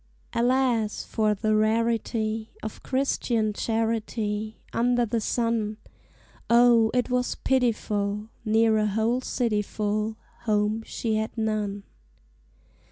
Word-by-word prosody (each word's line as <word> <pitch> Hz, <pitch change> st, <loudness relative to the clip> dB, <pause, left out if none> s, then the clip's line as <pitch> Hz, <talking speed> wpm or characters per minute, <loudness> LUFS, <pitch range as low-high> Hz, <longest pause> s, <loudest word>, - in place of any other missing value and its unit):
Alas! 240 Hz, -3 st, +1 dB
for 215 Hz, -1 st, 0 dB
the 215 Hz, +1 st, +1 dB
rarity 220 Hz, 0 st, 0 dB
Of 215 Hz, -, -6 dB
Christian 240 Hz, -5 st, 0 dB
charity 220 Hz, -1 st, -2 dB
Under 240 Hz, +1 st, +2 dB
the 230 Hz, 0 st, -1 dB
sun! 225 Hz, -2 st, 0 dB, 0.7 s
O, 235 Hz, -1 st, +6 dB
it 250 Hz, 0 st, 0 dB
was 250 Hz, 0 st, 0 dB
pitiful! 215 Hz, -5 st, 0 dB
Near 220 Hz, 0 st, +3 dB
a 215 Hz, -, +2 dB
whole 225 Hz, +4 st, +1 dB
city 230 Hz, -5 st, 0 dB
full, 210 Hz, +1 st, -2 dB, 0.3 s
Home 210 Hz, 0 st, +1 dB
she 220 Hz, -2 st, -1 dB
had 220 Hz, +2 st, -3 dB
none. 210 Hz, -2 st, -1 dB
220 Hz, 105 wpm, -26 LUFS, 215-235 Hz, 0.7 s, O